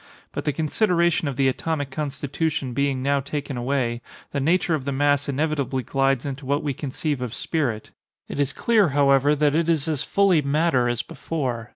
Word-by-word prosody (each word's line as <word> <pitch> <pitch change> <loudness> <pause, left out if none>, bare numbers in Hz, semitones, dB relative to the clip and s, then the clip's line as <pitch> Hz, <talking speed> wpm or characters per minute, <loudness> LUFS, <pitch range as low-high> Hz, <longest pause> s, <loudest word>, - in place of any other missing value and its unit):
But - - -5
the 150 - +2
consideration 170 +1 +1
of 140 - -2
the 135 0 +2
atomic 145 +1 -2
constitution 145 -1 -2
being 135 0 0
now 140 +1 +2
taken 140 0 -4
away, 120 -1 -1 0.3
the 140 - -1
nature 170 +4 +2
of 145 -4 -1
the 140 - -1
mass 145 +1 +1
inevitably 140 -2 -1
glides 135 +1 +1
into 140 0 -5
what 140 +3 0
we 145 -2 -1
conceive 140 +1 -3
of 125 -2 -4
spirit. 125 -10 -2 0.4
It - - -6
is 145 -1 +1
clear, 215 -7 +3
however, 140 +1 +4
that 145 0 +2
it 165 +1 +1
is 160 -2 +2
as 155 -4 -1
fully 195 -5 +3
matter 140 -3 +2
as 120 -1 -1
before. 135 -7 -4
140 Hz, 185 wpm, -24 LUFS, 135-155 Hz, 0.4 s, however